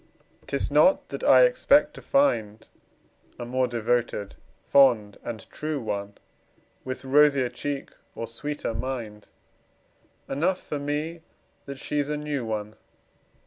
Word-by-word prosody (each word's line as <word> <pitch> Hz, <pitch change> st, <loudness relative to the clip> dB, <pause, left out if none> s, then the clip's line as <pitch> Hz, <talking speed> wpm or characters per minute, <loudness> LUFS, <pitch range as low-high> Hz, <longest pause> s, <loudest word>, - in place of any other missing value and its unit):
'Tis -, -, -2 dB
not -, -, +4 dB
that -, -, -6 dB
I -, -, +7 dB
expect 300 Hz, -, +4 dB
to -, -, -11 dB
find 110 Hz, -, +1 dB, 0.7 s
A 120 Hz, -, -6 dB
more 130 Hz, +1 st, 0 dB
devoted, 120 Hz, -3 st, -1 dB, 0.3 s
fond 120 Hz, -7 st, +4 dB
and 110 Hz, -4 st, -7 dB
true 155 Hz, -1 st, -3 dB
one, 100 Hz, -3 st, -4 dB, 0.7 s
With 130 Hz, +1 st, -6 dB
rosier 140 Hz, -2 st, +4 dB
cheek 140 Hz, +3 st, -5 dB, 0.2 s
or 115 Hz, -, -4 dB
sweeter 145 Hz, +2 st, -4 dB
mind 115 Hz, -4 st, -5 dB, 1.0 s
Enough 175 Hz, +7 st, 0 dB
for 150 Hz, -, -5 dB
me 150 Hz, +4 st, -3 dB, 0.5 s
that 140 Hz, -1 st, -6 dB
she's 145 Hz, +1 st, -2 dB
a 150 Hz, -, -1 dB
new 150 Hz, -3 st, -3 dB
one. 110 Hz, -1 st, -4 dB
130 Hz, 125 wpm, -26 LUFS, 115-150 Hz, 1.0 s, I